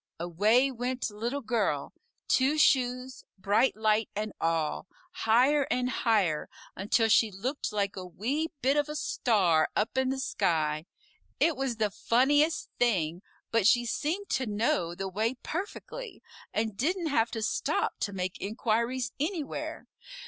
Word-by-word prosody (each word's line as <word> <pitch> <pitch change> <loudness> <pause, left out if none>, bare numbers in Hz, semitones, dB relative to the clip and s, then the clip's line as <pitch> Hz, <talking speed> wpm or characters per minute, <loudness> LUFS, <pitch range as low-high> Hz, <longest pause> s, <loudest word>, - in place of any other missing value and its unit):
Away 210 +10 +3
went 250 -1 -3
Little 235 +7 -3
Girl 230 -1 -1 0.3
Two 270 +4 +3
Shoes, 255 -2 +2
Bright 205 +7 +2
Light, 215 0 +1
and 215 +1 -3
all 165 +1 0 0.2
higher 275 -2 +3
and 250 0 0
higher, 200 -13 +1 0.3
until 215 +4 +2
she 220 0 +4
looked 240 +8 -3
like 200 -2 -1
a 185 - -6
wee 255 - -2 0.2
bit 275 +3 +3
of 295 0 +1
a 300 - -4
star 185 - +2
up 225 +5 0
in 260 0 +1
the 265 - -1
sky. 160 - 0 0.5
It 330 - +3
was 265 -3 -2
the 215 -2 0
funniest 290 +9 +2
thing, 180 -8 +1 0.3
but 225 -3 +3
she 240 +1 +4
seemed 335 - -2
to 260 -2 0
know 205 -5 0
the 195 +2 -4
way 220 +6 -1
perfectly, 415 +6 -6 0.3
and 215 -1 -1
didn't 335 - 0
have 230 -5 +2
to 225 -1 -4
stop - - -1
to 205 - -2
make 185 -1 -4
inquiries 235 +4 -1
anywhere. 310 -1 -3
230 Hz, 145 wpm, -29 LUFS, 200-265 Hz, 0.5 s, she